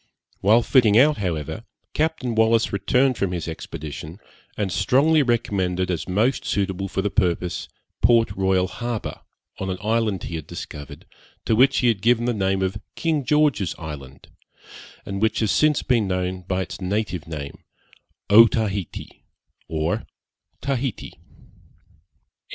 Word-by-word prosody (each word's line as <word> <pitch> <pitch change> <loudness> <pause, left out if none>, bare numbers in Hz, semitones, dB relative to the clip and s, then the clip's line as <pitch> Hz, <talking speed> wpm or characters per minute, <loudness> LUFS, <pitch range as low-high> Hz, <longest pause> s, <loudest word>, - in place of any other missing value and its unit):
While 110 +4 +4
fitting 115 -6 +4
out, 145 +3 +5
however, 90 +1 -3 0.3
Captain 155 -6 -1
Wallis 110 0 +3
returned 125 +6 +2
from 100 -2 0
his 85 -2 -4
expedition, 80 0 -7 0.4
and 100 -3 -1
strongly 135 - +3
recommended 95 -7 0
as 85 +1 -3
most 110 +8 +1
suitable 95 -1 -1
for 95 0 -2
the 105 - -1
purpose, 90 -3 0 0.3
Port 115 -3 +4
Royal 95 -1 +1
Harbour, 120 +2 -5 0.4
on 95 - -3
an 95 - -2
island 110 -3 0
he 85 - -4
had 80 - -8
discovered, 70 -1 -9 0.4
to 110 - +2
which 130 +4 +4
he 125 - +2
had 110 -5 +1
given 120 +1 +3
the 120 - +1
name 95 -2 0
of 95 +2 -2
'King 160 -4 0
George's 145 - +2
Island,' 70 -4 -9 0.8
and 100 0 -4
which 110 0 +2
has 110 -3 +1
since 155 -1 +3
been 115 -5 +2
known 90 0 -2
by 95 0 0
its 90 - -9
native 95 -4 -2
name, 75 -3 -7 0.6
Otaheite 105 -3 +3 0.5
or 80 0 -2 0.6
Tahite. 135 -3 -2
100 Hz, 140 wpm, -23 LUFS, 90-120 Hz, 0.8 s, out